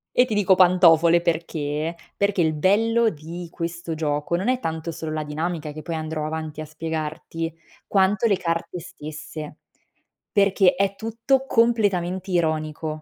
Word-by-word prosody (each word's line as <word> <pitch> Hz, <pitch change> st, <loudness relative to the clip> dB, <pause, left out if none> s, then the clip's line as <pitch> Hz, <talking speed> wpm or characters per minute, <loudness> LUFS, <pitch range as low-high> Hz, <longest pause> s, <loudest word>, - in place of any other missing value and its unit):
E 250 Hz, -, +6 dB
ti 240 Hz, -4 st, -3 dB
dico 195 Hz, -2 st, +4 dB
pantofole 175 Hz, -2 st, +6 dB
perché? 160 Hz, -2 st, -2 dB, 0.2 s
Perché 200 Hz, -2 st, +1 dB
il 160 Hz, -2 st, +2 dB
bello 225 Hz, +8 st, +3 dB
di 170 Hz, 0 st, -7 dB
questo 170 Hz, -1 st, -4 dB
gioco, 150 Hz, +1 st, -1 dB
non 190 Hz, +6 st, -2 dB
è 255 Hz, 0 st, +2 dB
tanto 160 Hz, -5 st, -3 dB
solo 160 Hz, -1 st, -5 dB
la 155 Hz, 0 st, -2 dB
dinamica 155 Hz, +1 st, -3 dB
che 155 Hz, +1 st, -8 dB
poi 165 Hz, -, -4 dB
andrò 155 Hz, -1 st, -3 dB
avanti 155 Hz, -1 st, -5 dB
a -, -, -4 dB
spiegarti, 160 Hz, +1 st, -4 dB, 0.3 s
quanto 195 Hz, +2 st, +2 dB
le 205 Hz, -4 st, +3 dB
carte 170 Hz, 0 st, -3 dB
stesse. 155 Hz, -1 st, -8 dB, 0.8 s
Perché 200 Hz, -2 st, +4 dB
è 195 Hz, +1 st, 0 dB
tutto 230 Hz, +6 st, 0 dB
completamente 200 Hz, -7 st, +1 dB
ironico. 155 Hz, -2 st, -1 dB
170 Hz, 150 wpm, -23 LUFS, 155-195 Hz, 0.8 s, E